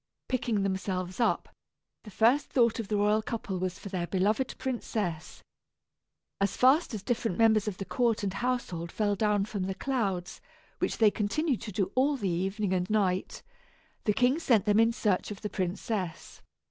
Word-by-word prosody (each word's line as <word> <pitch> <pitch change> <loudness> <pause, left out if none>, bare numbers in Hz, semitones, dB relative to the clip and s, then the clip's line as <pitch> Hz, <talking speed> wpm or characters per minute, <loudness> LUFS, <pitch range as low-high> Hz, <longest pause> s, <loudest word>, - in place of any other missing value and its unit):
Picking 230 -5 0
themselves 190 -1 -2
up, 235 - +1 0.6
the - - -8
first 235 +8 +3
thought 235 -3 +2
of 225 - -3
the 210 0 0
royal 210 +1 +3
couple 215 -4 -4
was 185 0 -2
for 200 - -8
their 180 -2 -2
beloved 210 +8 0
princess. 210 -10 -3 1.0
As 200 -1 0
fast 265 +1 +4
as 205 - -6
different 230 -6 -1
members 220 -2 +4
of 200 -3 -3
the 195 - -5
court 235 -2 0
and 195 -2 -1
household 215 -10 -2
fell 210 -2 0
down 205 -1 +1
from 200 -3 -3
the 190 0 -3
clouds, 195 -10 -2 0.4
which - - -1
they 215 -2 +5
continued 250 +7 -1
to 215 - -6
do 190 -1 -1
all 275 +3 +2
the 200 -6 -1
evening 190 +3 -1
and 180 0 -1
night, 190 -4 0 0.6
the 210 - +3
king 255 +7 +2
sent 230 - +3
them 210 0 +4
in 225 +1 +5
search 210 -5 0
of 205 -2 -7
the 210 - -4
princess. 185 -1 -3
210 Hz, 175 wpm, -29 LUFS, 190-230 Hz, 1.0 s, they